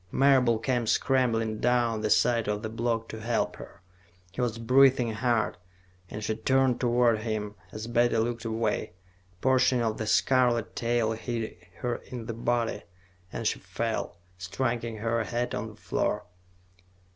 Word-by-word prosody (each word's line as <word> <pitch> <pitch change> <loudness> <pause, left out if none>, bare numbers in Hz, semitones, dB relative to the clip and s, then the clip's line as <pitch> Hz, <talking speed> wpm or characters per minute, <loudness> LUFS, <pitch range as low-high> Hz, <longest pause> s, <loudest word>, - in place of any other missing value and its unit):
Marable 130 -4 +4
came 120 -1 -1
scrambling 115 -4 +1
down 120 -3 +1
the 110 - 0
side 115 0 +3
of 105 +1 -2
the 110 - -3
block 115 0 -1
to 110 - -6
help 115 +1 -1
her. - - -12 0.5
He 100 - -4
was 120 -2 -1
breathing 125 0 +4
hard, 115 0 0 0.5
and 105 - -6
she 110 +1 -1
turned 130 -1 +2
toward 120 -2 +3
him; 110 -2 -3 0.2
as 110 +1 -6
Betty 120 0 +2
looked 115 0 -1
away, 110 -4 -1 0.4
a 90 - -33
portion 130 -1 +3
of 110 -1 -1
the 110 - -3
scarlet 125 -1 +2
tail 120 -1 +1
hit 115 0 -4 0.3
her 120 -1 -1
in 120 -3 -8
the 115 - -4
body 120 0 -1 0.5
and - - -5
she - - 0
fell, - - -3 0.2
striking 115 +4 -2
her 115 +1 0
head 120 +3 -2
on 110 +2 -3
the 110 - -11
floor. - - -2
115 Hz, 155 wpm, -28 LUFS, 110-125 Hz, 0.5 s, Marable